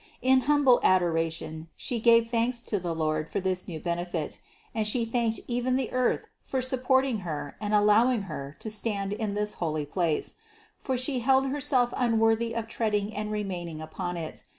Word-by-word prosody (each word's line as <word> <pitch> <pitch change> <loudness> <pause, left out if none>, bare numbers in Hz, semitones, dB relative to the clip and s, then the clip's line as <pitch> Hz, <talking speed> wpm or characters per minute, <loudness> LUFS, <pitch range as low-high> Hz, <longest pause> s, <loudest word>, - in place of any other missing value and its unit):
In 260 0 +5
humble 285 -4 +5
adora 165 -3 +3
tion 160 0 -6
She 240 - -2
gave 230 0 +5
thanks 235 +1 0
to 205 - -1
the 170 -2 -3
Lord 155 -1 -1
for 200 - -1
this 185 -1 -1
new 160 -3 -5
benefit, 170 -1 -3 0.3
and 220 -1 0
She 230 +2 +1
thanked 230 -1 0
even 245 +1 0
the 260 -2 -1
earth 255 -1 +1 0.2
for 265 - -2
supporting 260 -1 +2
Her 155 -5 -5
and 210 -1 -2
allowing 210 +2 +4
Her 150 -5 -7
to 220 - -5
stand 205 -2 -1
in 210 -1 -2
this 210 0 -1
holy 155 -3 -1
place; 165 0 -1 0.4
for 260 -2 -2
She 255 +1 -1
held 265 +2 +3
Herself 265 -3 +1
unworthy 230 -1 +2
of 230 -1 -2
treading 215 -2 -1
and 210 0 -3
remaining 180 -6 -4
upon 175 +3 -5
it. 160 -2 -6
215 Hz, 175 wpm, -28 LUFS, 175-245 Hz, 0.4 s, In